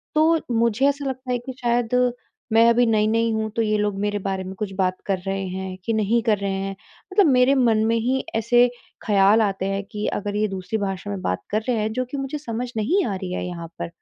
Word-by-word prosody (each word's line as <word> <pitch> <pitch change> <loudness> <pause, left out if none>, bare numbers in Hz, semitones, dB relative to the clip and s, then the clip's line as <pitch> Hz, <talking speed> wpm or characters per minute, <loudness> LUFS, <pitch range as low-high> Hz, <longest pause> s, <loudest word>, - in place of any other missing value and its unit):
तो 320 +1 +4 0.2
मुझे 235 +3 +2
ऐसा 285 0 -3
लगता 260 -1 -4
है 245 - +2
कि 260 - -5
शायद 240 0 +1 0.6
मैं 230 +1 +6
अभी 240 +1 +4
नई-नई 225 +1 +2
हूँ 220 0 -1
तो 230 - +1
ये 215 -1 +1
लोग 205 -1 -1
मेरे 205 0 -1
बारे 190 -1 -3
में 190 +1 -7
कुछ 195 -1 -4
बात 185 -1 +1
कर 195 -2 0
रहे 195 0 -1
हैं, 185 0 -5
कि 230 - 0
नहीं 220 +2 +2
कर 215 -3 +2
रहे 200 0 -2
हैं। 195 0 -3 0.4
मतलब 405 -2 +5
मेरे 255 +2 +4
मन 225 -4 +3
में 230 +1 +2
ही 255 +4 0
ऐसे 240 +2 +4 0.4
ख़याल 205 +1 +5
आते 195 -2 0
हैं 195 +1 -2
कि 210 0 -4
अगर 205 0 -4
ये 215 0 +1
दूसरी 195 +3 -3
भाषा 195 0 -3
में 195 -2 -4
बात 90 0 -2
कर 215 +1 0
रहे 245 -2 +1
हैं, 215 0 -1
जो 255 +1 -1
कि 275 +3 -6
मुझे 275 +2 -3
समझ 245 -3 -4
नहीं 350 - +2
आ 200 - -2
रही 185 -1 -5
है - - -3
यहाँ 170 -2 -6
पर। - - -2
220 Hz, 240 wpm, -23 LUFS, 195-245 Hz, 0.6 s, मैं